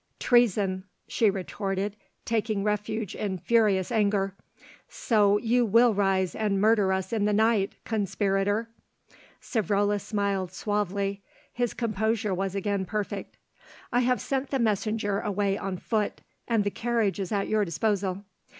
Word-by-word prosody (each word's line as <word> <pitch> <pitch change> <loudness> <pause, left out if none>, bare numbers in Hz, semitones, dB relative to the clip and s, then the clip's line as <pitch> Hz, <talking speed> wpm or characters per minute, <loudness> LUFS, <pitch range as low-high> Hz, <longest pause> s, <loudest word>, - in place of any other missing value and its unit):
"Treason," 200 -6 +2 0.2
she 220 - +2
retorted 195 +1 -3 0.3
taking 220 -3 0
refuge 210 0 -2
in 195 -3 -3
furious 210 -2 +2
anger. 200 -3 +1 0.6
"So 205 -3 +3
you 240 +3 +2
will 230 +2 +5
rise 195 -2 +1
and 210 -3 0
murder 210 -2 +3
us 190 +2 -2
in 210 -2 +1
the 210 - +2
night, 215 -2 +2
conspirator!" 205 0 0 0.7
Savrola 205 -1 0
smiled 200 -4 -1
suavely; 200 0 -2 0.3
his 245 -1 -1
composure 220 -2 0
was 195 +1 -2
again 200 0 -1
perfect. 210 +1 -4 0.6
"I 245 - +4
have 250 0 +2
sent 270 0 -2
the 275 - 0
messenger 215 -2 0
away 205 -2 0
on 195 -2 -4
foot, 215 +2 -2 0.3
and 230 -3 +2
the 205 - -1
carriage 230 -4 0
is 195 0 -3
at 200 -2 0
your 215 -1 +2
disposal. 195 +2 -1
205 Hz, 135 wpm, -27 LUFS, 195-220 Hz, 0.7 s, will